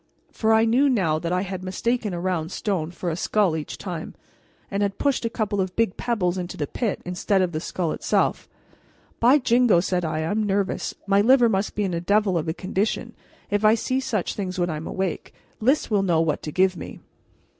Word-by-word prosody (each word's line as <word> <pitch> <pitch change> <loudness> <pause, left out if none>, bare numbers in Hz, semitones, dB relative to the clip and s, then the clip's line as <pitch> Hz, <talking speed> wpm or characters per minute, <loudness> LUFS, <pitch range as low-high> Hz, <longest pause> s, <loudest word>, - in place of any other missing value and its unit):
For 220 -1 +1
I 220 0 +5
knew 255 +5 +3
now 175 -11 +1
that 170 +1 -3
I 180 0 +1
had 190 -1 -5
mistaken 215 +4 -1
a 175 - -3
round 175 -2 -2
stone 185 -7 -2
for 175 0 -4
a - - -2
skull 190 -1 +1
each 155 -2 -5
time, 175 -5 -6 0.6
and 200 +1 -1
had 200 -1 0
pushed 280 -4 0
a - - +1
couple 210 -3 -1
of 185 -1 -3
big 230 -5 +1
pebbles 190 -7 -1
into 175 0 -5
the 145 - -1
pit 220 - -3
instead 180 +2 0
of 180 - -1
the 155 - -2
skull 170 0 -2
itself. - - 0 0.7
"By 250 +5 +6
jingo!" 245 -7 +4
said 180 0 0
I, 155 -1 -1
"I'm 205 +7 0
nervous; 200 -1 -1
my 200 0 +4
liver 245 +1 +5
must 195 -1 -1
be 210 - 0
in 190 -3 -1
a 170 - -2
devil 200 +1 +2
of 165 -1 -1
a 160 - 0
condition 190 +3 -2 0.4
if 205 +1 +1
I 215 +1 +6
see 255 +3 -1
such 240 -8 -2
things 190 -2 -4
when 175 -1 0
I'm 155 +1 -5
awake! 190 -3 -3 0.2
Lys 260 +3 +1
will 205 -2 +3
know 175 -4 +2
what 160 -2 0
to 150 - -5
give 185 +3 +2
me." - - -8
190 Hz, 215 wpm, -24 LUFS, 175-220 Hz, 0.7 s, By